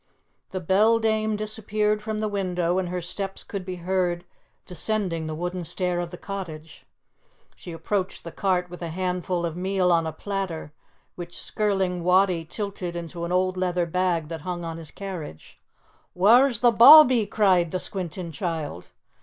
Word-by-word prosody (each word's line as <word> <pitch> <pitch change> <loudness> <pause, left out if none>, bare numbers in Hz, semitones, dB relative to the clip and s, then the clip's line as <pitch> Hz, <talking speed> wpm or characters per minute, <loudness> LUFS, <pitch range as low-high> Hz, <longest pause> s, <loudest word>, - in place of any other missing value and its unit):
The 185 - -4
beldame 220 +3 +2
disappeared 215 0 -1
from 215 0 -3
the 215 - 0
window, 180 -3 -1
and 180 -2 -2
her 180 -1 -3
steps 195 +2 -3
could 200 -3 -6
be 185 0 -5
heard 175 -1 -1 0.4
descending 180 -3 -2
the 155 - -4
wooden 180 +2 -4
stair 175 +1 -1
of 175 -1 -3
the 180 - -9
cottage. 165 -6 -8 0.7
She 175 - -10
approached 185 +4 -3
the 170 - -7
cart 180 -1 0
with 175 0 -11
a 170 - -3
handful 180 0 -2
of 165 -1 -4
meal 185 0 +1
on 165 -1 +2
a - - -2
platter 175 -3 -5 0.4
which 175 -1 -8
Skirling 195 -4 -1
Wattie 180 -2 +3
tilted 195 -1 -5
into 170 0 -5
an 170 - -5
old 185 0 +1
leather 180 -1 0
bag 170 -2 0
that 165 -2 -6
hung 175 +1 -4
on 165 0 -5
his 160 -2 -8
carriage. 180 - -8 0.6
"Whaur's 235 +6 +5
the 240 -1 +6
bawbee?" 250 -1 +8
cried 190 -5 +3
the 185 - -2
squinting 180 -2 -3
child. 155 - -4
180 Hz, 160 wpm, -25 LUFS, 170-200 Hz, 0.7 s, bawbee